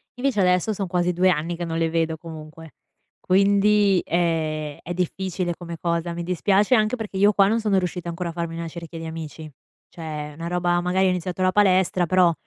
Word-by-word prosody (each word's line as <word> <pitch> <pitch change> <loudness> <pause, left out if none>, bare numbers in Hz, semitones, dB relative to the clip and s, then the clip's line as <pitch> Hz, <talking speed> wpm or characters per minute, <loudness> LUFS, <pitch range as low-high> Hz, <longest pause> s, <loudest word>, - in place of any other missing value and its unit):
Invece 250 -3 -1
adesso 180 +3 +2
son 195 -2 -3
quasi 175 0 +1
2 180 +2 +3
anni 170 0 -1
che 175 +1 -4
non 165 -1 -3
le 165 0 +1
vedo, 160 -1 -1
comunque. 160 -1 -11 0.5
Quindi 200 0 +3
ehm, 155 -3 -1
è 175 - -4
difficile 180 0 -2
come 170 -1 -8
cosa, 170 0 -1
mi 170 0 -4
dispiace 195 +6 +2
anche 215 +1 +2
perché 210 -4 -6
io 205 +2 +5
qua 195 0 +4
non 225 +3 +1
sono 210 -3 +1
riuscita 180 -1 -4
ancora 170 +1 -4
a - - -4
farmi 170 -1 -4
una 165 0 -4
cerchia 165 0 -8
di 165 - -6
amici. 160 -1 -7 0.4
Cioè, 150 -3 -6
una 170 - -5
roba 175 0 +1
magari 185 +2 +1
ho - - +3
iniziato 180 0 -3
la 185 0 +3
palestra, 185 -3 +3
però, 180 0 +4
175 Hz, 200 wpm, -23 LUFS, 165-190 Hz, 0.5 s, io